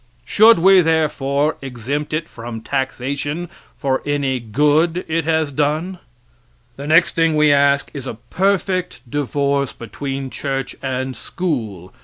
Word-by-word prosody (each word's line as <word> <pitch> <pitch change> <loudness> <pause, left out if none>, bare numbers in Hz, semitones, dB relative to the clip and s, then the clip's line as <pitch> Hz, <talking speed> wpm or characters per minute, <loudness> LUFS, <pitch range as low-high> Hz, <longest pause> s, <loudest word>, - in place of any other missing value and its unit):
Should 225 +2 +6
we, 190 +2 +6
therefore, 150 -3 +1
exempt 135 +3 -4
it 155 +1 -2
from 115 -1 -8
taxation 140 +6 -3 0.3
for 135 -2 0
any 140 -3 -1
good 150 - +1
it 160 0 -1
has 160 -2 +1
done? 155 +6 -1 0.8
The 140 +3 -7
next 165 +3 +4
thing 165 -1 +2
we 150 -1 +5
ask 140 0 +2
is 135 -3 -6
a - - -5 0.2
perfect 185 -5 0
divorce 140 0 -1
between 135 +4 -5
church 135 -2 -3
and 130 -1 -3
school. 110 - -4
145 Hz, 130 wpm, -19 LUFS, 135-160 Hz, 0.8 s, Should